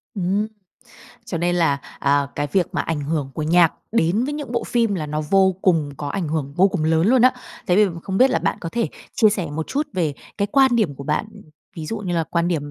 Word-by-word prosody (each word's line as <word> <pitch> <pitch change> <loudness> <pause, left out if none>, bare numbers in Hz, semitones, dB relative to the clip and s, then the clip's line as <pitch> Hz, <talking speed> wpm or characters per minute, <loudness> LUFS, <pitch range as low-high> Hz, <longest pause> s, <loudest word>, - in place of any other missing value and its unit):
Ừm. 195 +2 0 0.8
Cho 190 -7 -4
nên 175 +1 +1
là, 160 -5 +2 0.2
à, 140 0 +2
cái 145 - 0
việc 185 -4 +2
mà - - +1
ảnh 165 -3 -2
hưởng 145 -1 -2
của 155 - -3
nhạc 165 +1 +4 0.2
đến 205 +2 +2
với 290 - -3
những 295 -5 -6
bộ 235 -2 -1
phim 230 -4 +1
là 160 -5 -3
nó 150 +1 -2
vô 190 -1 +4
cùng 160 -6 +2
có 145 - -5
ảnh 170 +2 -3
hưởng 145 -3 -2
vô 190 +2 +5
cùng 185 -5 -2
lớn 160 +2 +2
luôn 250 +2 +4
á. 255 +1 +6 0.3
Thế 180 - +3
thì 210 - +6 0.2
không 190 -1 -2
biết 265 +1 +6
là - - +2
bạn 165 - -1
có 165 - -4
thể 230 +6 -1 0.3
chia 220 - +5
sẻ 195 -5 -2
một 155 +1 -4
chút 295 +2 -1
về 165 -7 -1 0.2
cái 200 - +1
quan 265 -3 +5
điểm 200 -11 +1
của 140 - -9
bạn, 210 - -1 0.5
ví 160 -2 -5
dụ 225 - -3
như 185 -4 -3
là 165 -1 +1
quan 170 +2 0
điểm 145 -4 -2
175 Hz, 250 wpm, -21 LUFS, 155-210 Hz, 0.8 s, á